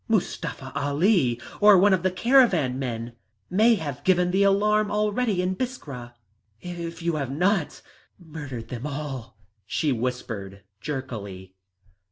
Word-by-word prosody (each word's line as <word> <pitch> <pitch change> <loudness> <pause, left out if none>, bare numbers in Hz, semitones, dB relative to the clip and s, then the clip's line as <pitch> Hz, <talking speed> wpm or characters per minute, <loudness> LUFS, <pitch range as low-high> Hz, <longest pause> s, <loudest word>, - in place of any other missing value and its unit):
"Mustafa 165 -10 -2
Ali, 145 - +2 0.2
or 210 -1 +8
one 195 +2 +5
of 185 - +2
the 185 - +2
caravan 185 - +3
men 120 -2 -4 0.4
may 225 +5 +5
have 150 -9 -5
given 180 -1 +3
the 190 +2 +2
alarm 210 +2 +3
already 210 -1 0
in 185 +1 -1
Biskra 140 - -6 0.4
if 170 0 -7
you 170 -2 0
have 140 -4 -2
not 175 +4 0 0.3
murdered 145 -9 -8
them 125 +3 -5
all," 135 -7 -6 0.3
she 150 +5 0
whispered 110 -5 -4 0.2
jerkily. 105 -10 -6
160 Hz, 130 wpm, -25 LUFS, 125-195 Hz, 0.4 s, or